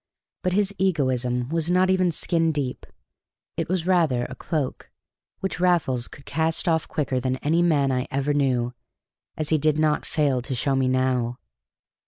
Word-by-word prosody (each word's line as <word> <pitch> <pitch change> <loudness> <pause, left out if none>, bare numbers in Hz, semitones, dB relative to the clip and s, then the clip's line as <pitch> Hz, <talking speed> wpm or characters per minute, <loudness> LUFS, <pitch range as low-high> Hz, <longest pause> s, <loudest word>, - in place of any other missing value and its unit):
But 185 - 0
his 200 0 +1
egoism 130 -9 0
was 165 +1 0
not 185 +1 +3
even 185 -2 +2
skin 165 0 +1
deep; 140 -4 -4 0.7
it - - -3
was 180 -2 0
rather 160 -10 +2
a - - -7
cloak, 150 -6 -3 0.5
which 190 -2 -3
Raffles 165 -9 +2
could 140 - -14
cast 160 +4 0
off 160 -1 +1
quicker 135 -4 -1
than 130 0 -1
any 165 +4 +2
man 145 -6 +3
I 125 0 -1
ever 140 +2 0
knew, 125 -4 +1 0.6
as 155 0 -1
he 155 - +3
did 155 +1 +2
not 155 -1 +2
fail 140 -5 0
to 130 +2 -4
show 135 +3 0
me 130 -1 +2
now. 130 -2 0
150 Hz, 170 wpm, -24 LUFS, 130-170 Hz, 0.7 s, not